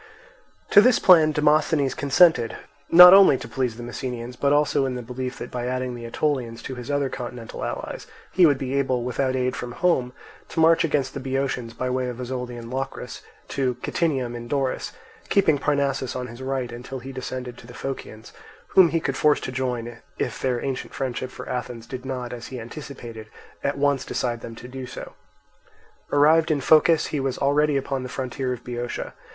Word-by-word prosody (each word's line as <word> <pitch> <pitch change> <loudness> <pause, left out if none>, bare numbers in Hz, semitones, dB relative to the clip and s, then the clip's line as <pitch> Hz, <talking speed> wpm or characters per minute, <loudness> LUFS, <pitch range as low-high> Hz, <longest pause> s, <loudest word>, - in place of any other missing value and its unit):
To 205 - +9
this 250 +2 +5
plan 160 -4 +6
Demosthenes 150 -2 +2
consented, 140 -4 +3 0.3
not 180 +2 +11
only 195 -8 +7
to - - -8
please 125 -4 -2
the 120 - -7
Messenians, 120 0 -5
but 140 +2 +1
also 145 -2 +2
in 130 - -3
the 125 - -5
belief 125 +2 -5
that - - -7
by 125 0 -3
adding 130 0 -2
the 120 -1 -8
Aetolians 120 -2 -2
to - - -5
his 125 0 -8
other 145 -1 +1
continental 120 -3 -7
allies - - -5 0.2
he 180 -2 +6
would 145 -3 +3
be 130 0 -4
able, 130 -3 0
without 130 +1 -1
aid 125 0 0
from 120 -1 -6
home, 130 -8 +1 0.4
to - - -4
march 165 +1 +5
against 140 -5 0
the - - -5
Boeotians 130 -3 -2
by 125 - -2
way 130 0 -1
of 125 0 -7
Ozolian 125 -2 -5
Locris 135 +1 -5 0.3
to 130 -3 -1
Kytinium 135 -8 -1
in 120 0 -7
Doris, 135 0 -1 0.4
keeping 160 -8 +3
Parnassus 140 -3 0
on 125 -1 -3
his 120 +1 -10
right 130 -2 -2
until 125 +3 -7
he 130 +2 -8
descended 130 -1 -6
to 115 - -14
the 125 - -12
Phocians, 120 -5 -7 0.4
whom 185 -3 +6
he 165 +2 +1
could 135 -4 -2
force 150 0 +3
to - - -4
join 125 -2 -2
him 120 -1 -9 0.2
if - - -3
their 125 -1 -1
ancient 135 -2 -4
friendship 130 -1 -3
for - - -10
Athens 125 -2 -5
did 130 +1 -7
not, 125 -2 -4
as 120 -1 -7
he 130 - -7
anticipated, 120 -3 -9 0.4
at 140 0 -1
once 140 -2 +1
decide 120 -2 -2
them 115 - -8
to 120 - -10
do 130 0 -7
so. - - -9 1.0
Arrived 160 +3 +4
in 155 -2 +2
Phocis 155 +3 +4
he 150 - 0
was 135 -1 -2
already 145 +1 +2
upon 135 0 -2
the 125 - -6
frontier 130 0 -3
of 125 -1 -5
Boeotia. 120 0 -5
130 Hz, 195 wpm, -24 LUFS, 125-145 Hz, 1.0 s, not